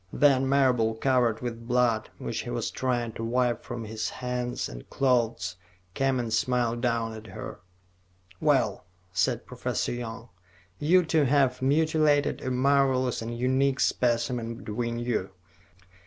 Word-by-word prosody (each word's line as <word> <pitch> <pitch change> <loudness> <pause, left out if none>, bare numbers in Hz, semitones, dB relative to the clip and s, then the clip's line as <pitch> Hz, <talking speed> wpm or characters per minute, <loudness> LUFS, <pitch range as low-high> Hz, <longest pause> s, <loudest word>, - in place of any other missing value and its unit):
Then, 135 -2 +3
Marable, 125 -5 +3
covered 120 -2 +1
with 115 -1 -5
blood, 120 -3 +2
which - - -4
he - - -7
was - - -2
trying 120 -3 -1
to 115 - -6
wipe 120 0 0
from 115 -2 -6
his 110 +1 -3
hands 125 -1 -3
and - - -10
clothes, 115 -9 +1 0.4
came 135 +1 +1
and 115 -2 -2
smiled 120 0 +1
down 115 -2 0
at 110 0 -10
her. - - -8 0.8
"Well," 130 -11 +1 0.3
said 90 -2 0
Professor - - -2
Young, 120 0 -6 0.5
"you 175 +4 +4
two 160 -2 +2
have 130 -2 +2
mutilated 150 +1 +2
a 130 - -3
marvelous 130 -1 +2
and 115 +1 -5
unique 130 +2 +1
specimen 120 -1 0
between 115 +2 -3
you." 120 -6 -2
125 Hz, 140 wpm, -27 LUFS, 115-130 Hz, 0.8 s, you